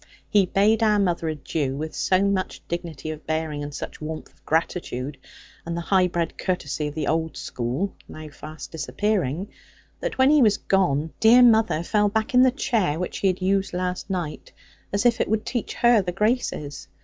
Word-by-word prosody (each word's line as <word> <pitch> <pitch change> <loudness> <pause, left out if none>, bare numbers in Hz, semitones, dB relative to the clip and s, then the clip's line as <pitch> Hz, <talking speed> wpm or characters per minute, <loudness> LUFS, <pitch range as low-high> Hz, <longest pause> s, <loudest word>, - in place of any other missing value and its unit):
He 200 -3 +3
bade 210 +4 +3
our 215 -2 +4
mother 175 -4 0
adieu, 145 -2 -2
with 155 +2 -4
so 185 +1 +2
much 200 -2 -1
dignity 165 -3 -4
of 155 0 -9
bearing, 155 -2 -2
and 145 0 -5
such 140 - -7
warmth 155 +1 -6
of - - -32
gratitude, 150 -4 -2 0.4
and 170 0 -4
the - - -2
high 185 +1 +3
bred 170 -1 -3
courtesy 155 -5 -2
of 150 - -7
the 155 -2 -2
old 160 +1 -1
school 130 +12 -3
(now 155 0 -9
fast 155 +2 -10
disappearing), 185 - -1 0.5
that - - -4
when 260 +2 +5
he 300 -1 +5
was 215 -4 +4
gone, 160 -5 +1
dear 235 +3 +7
mother 220 -8 +4
fell 210 +3 +2
back 220 +5 -1
on 250 - +6
the 260 - +6
chair 220 - 0
which 180 +1 -4
he 195 - +2
had 185 0 0
used 195 -1 +1
last 180 +2 -3
night, 175 -5 -4 0.4
as 200 +3 0
if 235 -1 +4
it - - 0
would 215 0 0
teach 240 -4 -3
her 235 -2 +5
the 180 -2 -3
graces. 200 - -1
180 Hz, 190 wpm, -24 LUFS, 155-210 Hz, 0.5 s, dear